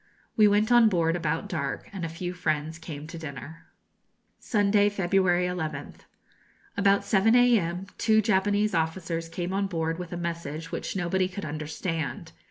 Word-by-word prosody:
We 215 -2 +6
went 210 +2 +2
on 240 -2 +7
board 165 -3 +1
about 165 -2 -2
dark, 140 -6 -3
and 190 -3 -5
a 165 - -2
few 175 +2 -5
friends 155 -2 -2
came 150 -3 -7
to 160 +1 -8
dinner. 155 +2 -9 0.7
Sunday, 205 -2 +3
February 185 -2 +2
11th. 155 -5 -5 0.7
About 200 0 +3
7 220 +3 +4
a.m., 195 -8 +3
two 220 -1 +4
Japanese 205 0 +2
officers 165 0 -2
came 175 +2 -4
on 195 0 0
board 165 -2 -2
with 175 -2 -6
a 175 - -4
message 165 -2 -5
which - - -4
nobody 185 0 +1
could 195 +2 -6
understand. 155 +1 -4
175 Hz, 155 wpm, -27 LUFS, 165-200 Hz, 0.7 s, on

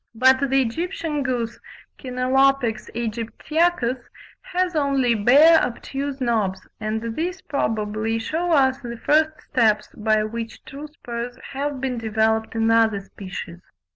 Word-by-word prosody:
But 260 +3 +4
the 270 0 +3
Egyptian 320 +3 -3
goose 245 -4 -2 0.4
(Chenalopex 255 -2 +1
aegyptiacus) 240 +4 -1 0.3
has 365 -7 -1
only 275 -5 +2
"bare 285 +10 +6
obtuse 270 +3 -4
knobs," 220 -7 -1
and 220 +1 -3
these 355 +3 -3
probably 220 -4 -1
shew 325 +10 -2
us 265 -4 +3
the 235 -2 -7
first 310 +4 +2
steps 220 -5 +2
by 215 0 +1
which 225 +1 -6
true 285 +3 -8
spurs 245 -5 -6 0.2
have 280 0 -3
been 255 -2 -2
developed 220 0 0
in 225 0 +2
other 225 -3 +3
species. 185 -3 -8
245 Hz, 125 wpm, -23 LUFS, 225-280 Hz, 0.4 s, bare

